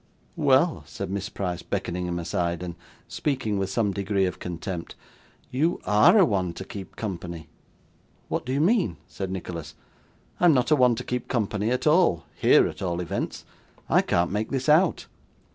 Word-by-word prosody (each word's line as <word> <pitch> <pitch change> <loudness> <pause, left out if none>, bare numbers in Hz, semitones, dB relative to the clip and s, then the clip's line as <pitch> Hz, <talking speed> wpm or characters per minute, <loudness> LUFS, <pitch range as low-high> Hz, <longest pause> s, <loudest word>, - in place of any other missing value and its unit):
'Well,' - - +3
said 100 -1 -6
Miss 100 +1 -3
Price, 90 -3 -3
beckoning 90 +1 -3
him 85 0 -2
aside, 85 0 -2
and 90 -1 -5 0.3
speaking 125 -8 -1
with 95 0 -1
some 105 0 +1
degree 100 0 0
of 90 - -3
contempt 90 0 -5 0.6
'you 155 +7 +1
ARE 105 - +6
a 195 - +7
one 95 - 0
to 95 - -7
keep 95 -1 -9
company.' 85 -6 -5 0.8
'What - - -2
do 130 - -4
you 140 +2 +1
mean?' 180 - +2
said 95 -1 -5
Nicholas; 85 -4 -6 0.6
'I - - +3
am 170 - +7
not 125 +4 +1
a - - +7
one 125 -4 +4
to - - -5
keep 125 0 -3
company 105 -3 -1
at 125 +1 -1
all 155 - +3
here - - +5
at - - -8
all 90 -2 -1
events. 90 +3 -4 0.4
I - - +5
can't 85 +1 +1
make 105 +2 -1
this 135 0 -2
out. 160 +3 +4
100 Hz, 180 wpm, -25 LUFS, 90-125 Hz, 0.8 s, a